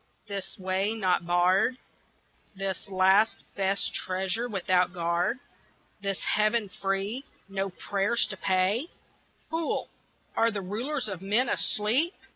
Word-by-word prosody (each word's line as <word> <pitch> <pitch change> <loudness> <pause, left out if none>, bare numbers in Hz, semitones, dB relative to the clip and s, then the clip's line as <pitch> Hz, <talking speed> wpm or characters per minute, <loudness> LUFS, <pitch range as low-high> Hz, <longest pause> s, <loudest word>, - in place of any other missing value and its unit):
this 200 -2 -5
way 190 +3 0
not 185 -5 +1
barred? 185 +7 +3 0.8
This 195 0 -4
last 190 +3 +4
best 195 0 0
treasure 190 +6 -1
without 185 -3 +2
guard? 175 +6 +1 0.6
This 195 -1 -1 0.2
heaven 215 0 +2
free 195 +6 -1 0.2
no 195 0 -2
prayers 200 +5 0
to 195 - -5
pay? 190 - +1 0.6
Fool 325 0 -1 0.5
are 230 - +4
the 205 -3 -3
Rulers 240 +7 -2
of 190 -4 -4
men 215 +6 +2
asleep? 240 - +2
195 Hz, 115 wpm, -28 LUFS, 185-220 Hz, 0.8 s, last